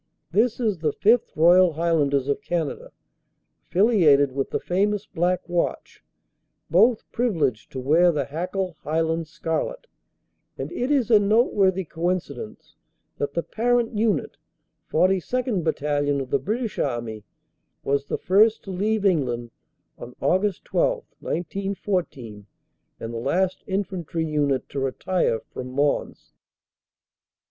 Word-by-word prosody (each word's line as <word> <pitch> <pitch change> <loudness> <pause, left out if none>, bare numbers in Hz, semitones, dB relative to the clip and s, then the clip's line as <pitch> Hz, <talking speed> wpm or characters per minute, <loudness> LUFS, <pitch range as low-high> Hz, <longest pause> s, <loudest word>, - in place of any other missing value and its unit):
This 225 +6 +2
is 215 -7 0
the 155 -2 0
5th. 225 +3 +2
Royal 175 +2 +5
Highlanders 145 -4 +1
of 145 +8 -1
Canada, 170 -7 -3 0.8
affiliated 170 - +4
with 135 +1 -2
the - - -1
famous 200 +3 0
Black 180 0 -1
Watch, 175 -1 -2 0.7
both 220 +7 +4
privileged 160 - -1
to 130 - -4
wear 160 +7 +4
the 145 -4 -1
Hackle 180 +4 -3
Highland 160 +1 -1
Scarlet, 165 - -3 0.7
and - - -5
it 260 -7 -2
is 265 -6 +2
a 215 - +8
noteworthy 200 -3 +2
coincidence 165 -9 -4 0.5
that 140 0 -3
the 170 - 0
parent 240 +1 0
unit, 215 0 0 0.5
42nd. 195 +3 +1
Battalion 145 -2 0
of 130 -2 -6
the 140 - +2
British 215 - -3
Army, 120 -5 -3 0.6
was 140 0 0
the - - -2
first 215 +4 +3
to 195 - -7
leave 205 +3 0
England 125 -10 0 0.5
on 125 - -9
Aug. 195 +2 +1
12, - - 0 0.2
1914, 175 - -3 0.5
and 115 +1 -6
the 115 - -3
last 180 +9 0
infantry 185 -4 -2
unit 145 -4 0
to 140 - -4
retire 135 -1 0
from 130 - -5
Mons. 140 +2 -1
175 Hz, 125 wpm, -24 LUFS, 145-205 Hz, 0.8 s, a